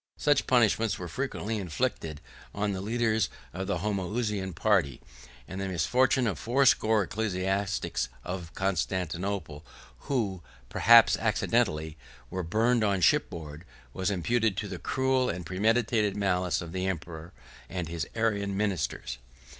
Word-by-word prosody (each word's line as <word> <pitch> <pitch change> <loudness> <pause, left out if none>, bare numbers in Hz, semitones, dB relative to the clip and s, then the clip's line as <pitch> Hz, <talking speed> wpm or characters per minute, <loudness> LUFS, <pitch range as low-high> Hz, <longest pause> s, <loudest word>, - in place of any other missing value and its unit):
Such 145 -2 +2
punishments 115 -3 +3
were 90 - -6
frequently 115 +1 -3
inflicted 80 -3 -2 0.3
on 105 0 0
the 95 -1 -3
leaders 110 +1 +1 0.2
of 95 +2 -4
the 100 - 0
Homoousian 100 -1 -2
party; 90 - +2 0.5
and 95 +1 -5
the 95 - -2
misfortune 125 - +2
of 110 - -1
fourscore 115 -4 +3
ecclesiastics 95 - -1
of 90 -2 -5
Constantinople, 95 -4 -2 0.5
who, 105 -9 0 0.3
perhaps - - +6
accidentally, 75 0 0 0.3
were 95 - -2
burned 110 +7 +2
on 100 -2 +2
shipboard, 80 -2 +1 0.3
was 95 +1 -1
imputed 105 +2 +1
to 105 - -2
the 95 -3 -6
cruel 130 +3 +1
and 90 0 -4
premeditated 105 +2 +1
malice 90 -3 0
of 85 - -8
the 95 +1 -2
emperor, 85 -2 -5 0.4
and 90 -3 -3
his 80 -4 -4
Arian 100 -3 0
ministers. 100 -10 -2
95 Hz, 130 wpm, -28 LUFS, 90-110 Hz, 0.5 s, perhaps